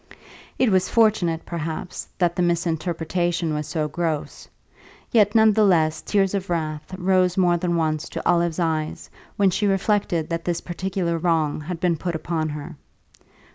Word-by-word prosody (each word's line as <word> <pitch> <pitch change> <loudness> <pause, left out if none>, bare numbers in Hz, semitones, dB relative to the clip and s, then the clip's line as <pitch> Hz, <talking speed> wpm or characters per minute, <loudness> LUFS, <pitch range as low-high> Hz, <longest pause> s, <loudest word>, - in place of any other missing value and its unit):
It 255 -4 +3
was 185 -1 +2
fortunate, 200 -8 +2
perhaps, 165 +1 -5
that 175 -2 +1
the 180 - 0
misrepresentation 170 0 -1
was 150 0 -3
so 155 0 -1
gross; 160 -1 -3 0.6
yet, 210 -2 +4
none 220 -1 +6
the 215 +1 +3
less, 160 -5 +3
tears 195 -2 +1
of 195 -2 -3
wrath 155 0 -3
rose 185 -1 +2
more 175 -2 +3
than 170 0 -1
once 155 -1 -1
to - - -4
Olive's 170 -2 +2
eyes 160 -3 -2 0.3
when 195 -2 +4
she 205 +4 0
reflected 195 -4 0
that 165 0 -2
this 175 -1 -1
particular 175 -1 -2
wrong 160 -3 +1
had 165 +2 -5
been 170 -2 +1
put 175 +1 -3
upon 160 -1 -2
her. 150 +2 -7
170 Hz, 160 wpm, -23 LUFS, 160-185 Hz, 0.6 s, none